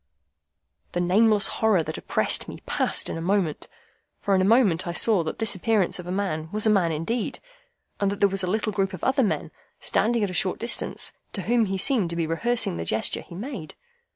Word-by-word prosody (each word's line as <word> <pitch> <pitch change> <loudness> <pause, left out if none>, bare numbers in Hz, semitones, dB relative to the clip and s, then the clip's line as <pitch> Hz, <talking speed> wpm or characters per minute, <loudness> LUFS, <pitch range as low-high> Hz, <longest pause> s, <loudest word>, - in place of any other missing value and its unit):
The 175 - -1
nameless 205 +4 +4 0.2
horror 215 -7 +4
that - - -5
oppressed - - -1
me - - -9
passed - - 0
in - - -4
a - - -5
moment, 180 -3 0 0.5
for 200 - 0
in 190 - +4
a - - +3
moment 195 -5 +3
I 170 - -2
saw 195 0 +2
that 155 - -4
this 225 -2 +3
appearance 200 -1 +1
of 180 - -8
a - - -3
man 180 -5 -2
was 215 +1 +2
a 215 - +5
man 185 -5 +3
indeed, 185 +10 -2 0.6
and 200 - +2
that 200 - -4
there 200 - +5
was 195 0 -3
a 185 - -2
little 215 +2 0
group 195 -1 0
of 185 - -8
other 265 +1 +2
men, 215 - -1 0.3
standing 230 0 +1
at 200 - -1
a - - -7
short 185 +1 +1
distance, 235 - 0 0.2
to 195 - -4
whom 235 +2 +2
he 195 0 -2
seemed 200 -2 +1
to 170 - -4
be 170 -1 0
rehearsing 165 - -1
the 85 - -3
gesture 110 +7 -1
he 170 - -12
made. 205 - -7
195 Hz, 220 wpm, -25 LUFS, 175-220 Hz, 0.6 s, a